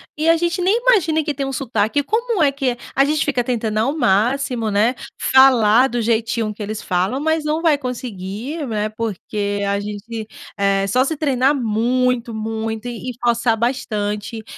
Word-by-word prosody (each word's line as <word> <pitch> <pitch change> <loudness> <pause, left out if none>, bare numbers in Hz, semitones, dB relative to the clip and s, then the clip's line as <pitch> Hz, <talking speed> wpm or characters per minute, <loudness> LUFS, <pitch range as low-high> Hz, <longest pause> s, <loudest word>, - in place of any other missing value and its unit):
e 310 +2 +1
a 330 - +5
gente 345 +2 -1
nem 385 +5 +3
imagina 345 -11 +3
que 300 -1 -2
tem 275 -1 -3
um - - -3
sotaque. 250 0 0
Como 445 - 0
é 285 - +4
que 275 -2 -1
é 240 - -6 0.2
a 275 - +5
gente 300 +2 +1
fica 255 -4 0
tentando 225 -3 -1
ao 270 +8 0
máximo, 240 +1 +1
né, 210 +4 +2 0.3
falar 255 -2 +5
do 240 - -2
jeitinho 230 -1 0
que 215 - -11
eles 210 +1 -4
falam, 185 +7 -1
mas 315 +1 0
não 305 +1 0
vai 325 -3 +3
conseguir, 250 - -5
né, 215 -2 -1
porque 210 -2 -3
a 200 0 0
gente 210 +2 -6 0.3
é 195 0 +1
só 250 +6 +2
se 310 +3 -2
treinar 275 -1 +2
muito 240 +1 0
muito 220 +1 -4
e 245 +1 -5
esforçar 235 -1 0
bastante 220 -3 -2
240 Hz, 175 wpm, -20 LUFS, 215-280 Hz, 0.3 s, a